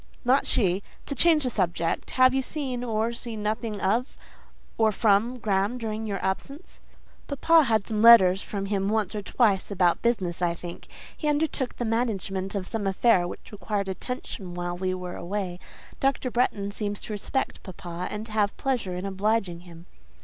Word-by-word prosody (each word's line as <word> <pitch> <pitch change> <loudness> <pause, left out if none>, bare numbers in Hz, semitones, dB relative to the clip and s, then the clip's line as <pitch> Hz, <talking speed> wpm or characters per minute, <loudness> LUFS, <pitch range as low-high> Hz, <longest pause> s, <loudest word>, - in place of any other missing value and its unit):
"Not 260 +3 +3
she. 190 -3 +2 0.2
To - - -2
change 315 +1 +4
the 255 - 0
subject. 170 -5 -1
Have 255 0 +6
you 265 - +2
heard 260 -3 -4
or 225 0 0
seen 230 -3 -6
nothing 215 0 -2
of, 225 +7 0 0.6
or 220 -1 +3
from, 220 +4 +2
Graham 210 +1 0
during 220 -2 -4
your 200 -2 -2
absence?" 275 - -4 0.5
"Papa 315 +2 +4
had 220 -3 +1
letters 210 -4 +7
from 195 -1 -4
him 195 -1 0
once 215 -1 0
or 210 - -3
twice 200 -2 +1
about 180 -4 +2
business, 190 -8 0
I 170 -1 +1
think. 170 0 -9 0.3
He 305 - -4
undertook 295 -3 0
the 240 - -3
management 205 -4 -1
of 195 -2 -2
some 205 0 -3
affair 190 -2 +3
which - - -9
required 205 -1 -3
attention 190 -3 -6
while 175 0 -3
we 185 +1 -1
were 180 -1 -6
away. 180 0 -4 0.4
Dr. 270 -2 0
Bretton 205 -5 0
seems 205 -1 -2
to 215 - -5
respect 210 +6 -3
papa, 175 -1 -6
and 210 +1 -5
to 225 - -11
have 210 -1 +1
pleasure 245 -9 -1
in 180 +2 -4
obliging 195 -2 0
him." 170 -1 -13
210 Hz, 170 wpm, -26 LUFS, 190-240 Hz, 0.6 s, letters